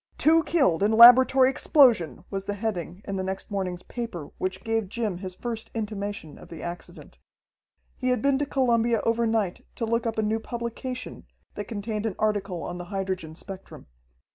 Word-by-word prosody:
"Two 325 +2 +5
Killed 270 - +2
in 210 +2 +3
Laboratory 255 +3 +8
Explosion!" 250 - +3
was 195 -1 -4
the 205 - -2
heading 195 -3 -4
in 195 -1 -3
the 190 - -2
next 190 +2 -5
morning's 185 -3 -3
paper 225 -11 -6
which 185 0 -3
gave 225 -3 -1
Jim 215 -5 -3
his 185 -1 -6
first 230 0 -5
intimation 205 -6 -5
of - - -14
the 165 - -9
accident. 175 0 -9 0.8
He 255 - 0
had 250 - +2
been 275 -1 +2
to 290 - -1
Columbia 235 -4 +2
overnight 225 -4 0
to 230 - -2
look 230 +1 0
up 225 - -3
a 220 - +1
new 215 +1 0
publication 240 +2 -6 0.3
that 205 - -5
contained 215 0 -3
an 200 - -4
article 200 -5 -1
on 175 0 -5
the 175 - -6
hydrogen 185 -4 -4
spectrum. 195 +2 -10
215 Hz, 175 wpm, -26 LUFS, 190-235 Hz, 0.8 s, Laboratory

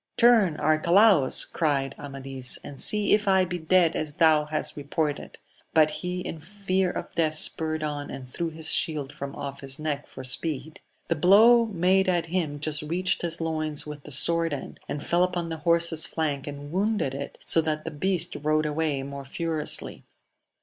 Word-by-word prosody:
Turn, 225 -9 +4
Arcalaus, 170 0 +4
cried 140 -4 -1
Ama 140 -1 -8
dis, 130 -2 -1
and 140 - -7
see 210 -1 +5
if 210 -1 +2
I 190 -1 +4
be 180 0 -5
dead 170 0 +2
as 150 -1 -3
thou 155 -1 +3
hast 155 0 -3
reported! 145 +1 -3 0.4
but 155 -1 +5
he 180 +4 -4
in 165 - -6
fear 190 +1 -2
of - - -6
death 155 -2 0
spurred 155 0 0
on, 145 -1 -4
and 135 -1 -8
threw 165 +6 -4
his 160 0 -2
shield 145 -3 0
from 140 0 -7
off 140 -1 -7
his 135 0 -6
neck 150 -2 -4
for 130 - -10
speed. 135 +4 -4 0.3
The 165 - 0
blow 220 +8 +6
made 190 -1 +2
at 175 -2 +1
him 165 -4 -2
just 150 0 -1
reached 180 +5 -1
his 170 -1 0
loins 155 -2 -2
with 150 -1 -8
the 150 - -11
sword 165 +3 +3
end, 140 - -7
and 145 - -5
fell 175 +1 +2
upon 175 -2 -2
the 160 - -4
horse's 170 -1 +3
flank 145 -4 -3
and 145 0 -8
wounded 200 -6 0
it, 140 +1 -7
so 165 - +3
that 155 -1 -3
the 165 - -4
beast 180 +3 0
rode 155 +1 +1
away 150 -2 -1
more 140 0 -7
furiously. 160 +2 -3
155 Hz, 185 wpm, -26 LUFS, 145-175 Hz, 0.4 s, blow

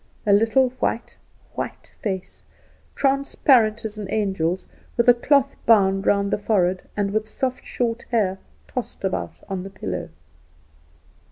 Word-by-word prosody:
A 205 - +4
little 225 +5 +4
white, 235 - -1 0.4
white - - -6
face, 190 -3 -4 0.5
transparent 265 -5 +3
as 215 0 -5
an 205 - -5
angel's 190 -4 -1 0.3
with 235 - +2
a 245 - +9
cloth 275 +3 +2
bound 195 -3 +4
round 200 0 +2
the - - +1
forehead, 190 -3 +1 0.2
and 200 -1 0
with 215 +1 -1
soft 255 +3 -3 0.4
hair 195 -5 +1 0.3
tossed 75 - -6
about 85 -2 -3
on 190 -2 -3
the 195 - -7
pillow. 95 - -5
210 Hz, 135 wpm, -23 LUFS, 190-235 Hz, 0.5 s, a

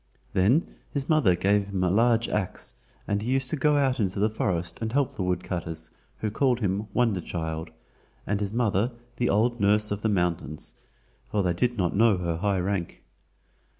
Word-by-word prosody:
Then 115 - +2
his 140 -2 -2
mother 145 - +4
gave 100 +2 +2
him 95 -2 -1
a 90 - +2
large 115 +2 +3
ax, 100 -3 -2 0.3
and 105 0 0
he 115 - -3
used 130 -1 +1
to - - +1
go 150 0 +3
out 135 -2 +2
in 105 - +3
the 100 +4 0
forest 85 -5 -1
and 110 -1 -2
help 140 0 +1
the - - -5
woodcutters, 85 -3 -3 0.3
who 110 - -1
called 125 +1 +2
him 100 0 -1
"Wonder 110 -5 +1
child," 80 -1 -4 0.6
and 100 -1 0
his 100 -1 -2
mother 115 0 +1 0.2
the 120 - +1
"Old 120 +4 +2
Nurse 105 +1 +3
of 105 0 -2
the 110 - +1
Mountains," 85 -6 -1 0.6
for 105 -2 +1
they 90 -1 +1
did 120 +7 0
not 90 -4 0
know 110 -1 +4
her 85 -2 -2
high 100 +2 +1
rank. 90 -1 -3
100 Hz, 185 wpm, -26 LUFS, 90-120 Hz, 0.6 s, mother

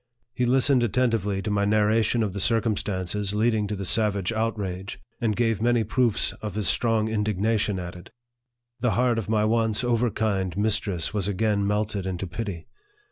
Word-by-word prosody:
He 125 0 0
listened 130 0 +3
attentively 110 -5 0
to 105 - -2
my 100 0 +1
narra 105 +2 +3
tion 115 +2 +1
of 100 -3 -2
the 100 - -4
circumstances 105 -3 0
leading 110 -1 +1
to 105 - -3
the 100 -1 -5
savage 100 -1 +1
outrage, 100 -4 -3 0.2
and 110 -3 0
gave 115 -2 0
many 120 0 +2
proofs 115 +1 +1
of 105 -2 -5
his 105 -1 0
strong 115 -2 +2
indignation 105 -1 0
at 90 0 -6
it. 90 0 -12 0.7
The 120 -1 +1
heart 120 -2 +2
of 110 - -6
my 110 -1 +2
once 110 +1 +1
overkind 110 -6 0
mistress 105 -4 0
was 100 -3 -1
again 100 0 0
melted 105 -2 -1
into 95 0 -3
pity. 90 -2 -5
105 Hz, 170 wpm, -25 LUFS, 100-115 Hz, 0.7 s, listened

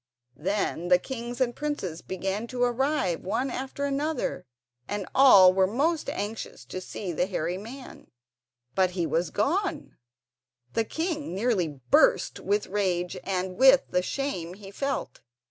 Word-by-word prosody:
Then 180 -1 -1
the 180 0 +6
kings 240 +3 -6
and 240 -2 +1
princes 290 - -3
began 195 +4 -3
to 245 0 -1
arrive 245 - +1
one 230 +8 -1
after 270 +2 -4
another, 285 - -2 0.4
and 205 -2 -3
all 195 -9 +8
were 190 0 +3
most 300 - 0
anxious 205 - -5
to 185 +9 -6
see 185 0 -5
the 175 +3 0
hairy 180 -1 -2
man; 255 +6 -10 0.7
but 185 -1 +3
he 170 - +1
was 165 +1 0
gone! 355 - -1 0.8
The 225 - +1
king 315 - -3
nearly 205 -4 +1 0.2
burst - - +4
with 205 +2 0
rage 185 -3 -1
and 185 -1 -2
with 265 +1 +7
the 180 - +2
shame 180 -7 -3
he 195 -1 -11
felt. 275 - -3
205 Hz, 145 wpm, -27 LUFS, 185-265 Hz, 0.8 s, all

